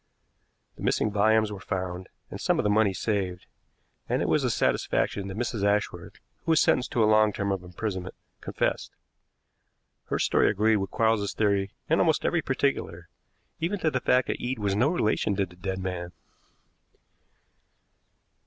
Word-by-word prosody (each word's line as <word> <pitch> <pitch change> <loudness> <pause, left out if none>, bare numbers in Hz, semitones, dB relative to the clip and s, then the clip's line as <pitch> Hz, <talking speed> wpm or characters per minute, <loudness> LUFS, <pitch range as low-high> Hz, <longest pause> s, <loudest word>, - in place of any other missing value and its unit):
The - - -12
missing 105 - +1
volumes 110 +1 +3
were 100 - -6
found, 90 -2 -4 0.2
and - - -7
some - - +2
of - - +1
the 105 - +2
money 105 -1 +3
saved; 95 -2 -2 0.6
and - - +1
it - - -1
was - - +2
a - - +1
satisfaction 100 -1 0
that 95 +1 -6
Mrs. 115 -3 -2
Ashworth, 100 -4 0 0.3
who 165 - +2
was 160 - +4
sentenced 125 - +2
to 115 - +3
a - - +5
long 110 0 +4
term 100 0 -2
of 95 -2 -2
imprisonment, 95 +1 -5 0.2
confessed. - - -2 1.1
Her - - -2
story - - +3
agreed 110 +1 +2
with 95 -1 -3
Quarles's 110 -2 +1
theory 100 -2 +1
in 165 - +2
almost 160 -3 +2
every 175 - +2
particular, 130 - -2 0.5
even 175 +5 -1
to 160 -4 0
the 130 - 0
fact 125 -1 +3
that - - -3
Eade 125 +1 -2
was 100 -2 -1
no 120 +7 +3
relation 110 - 0
to 100 0 +1
the 90 -1 -17
dead 95 +1 -4
man. 90 -2 -4
105 Hz, 170 wpm, -27 LUFS, 95-110 Hz, 1.1 s, a